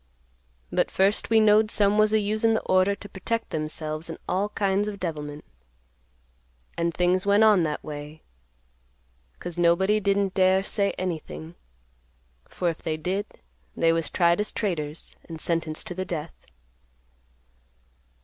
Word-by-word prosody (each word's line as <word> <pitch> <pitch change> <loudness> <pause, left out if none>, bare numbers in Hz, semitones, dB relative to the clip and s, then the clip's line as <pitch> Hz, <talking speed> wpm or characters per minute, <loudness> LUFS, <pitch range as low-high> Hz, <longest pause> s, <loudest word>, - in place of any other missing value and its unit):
But - - +1
first 195 +2 +1
we 225 -1 +5
knowed 215 0 +5
some 205 -1 +2
was 215 0 +4
a 220 - +4
usin' 215 +2 +1
the - - 0
order 185 +2 +2
to 205 - -10
protect 225 +4 -3
themselves 155 +1 -4
in 165 - -6
all 195 +3 0
kinds 200 0 0
of 205 -1 -5
devilment, 150 -4 -5 1.3
and 170 0 0
things 180 +3 +1
went 205 +2 +5
on 210 -4 +6
that 155 -2 -2
way, 150 +1 -8 1.1
'cause 175 -1 -6
nobody 190 +5 +3
didn't 200 -1 +1
dare 190 0 +3
say 200 0 +1
anything; 165 -2 -5 1.0
for 180 - -2
if 165 -2 -2
they 155 -1 -2
did 190 +6 -2 0.5
they 165 0 +3
was 165 -2 0
tried 170 0 +3
as 210 - 0
traitors, 160 -7 -3
and 165 -1 -8
sentenced 165 -2 -1
to - - -5
the 185 +1 -3
death. 160 -3 -6
185 Hz, 145 wpm, -25 LUFS, 165-205 Hz, 1.3 s, on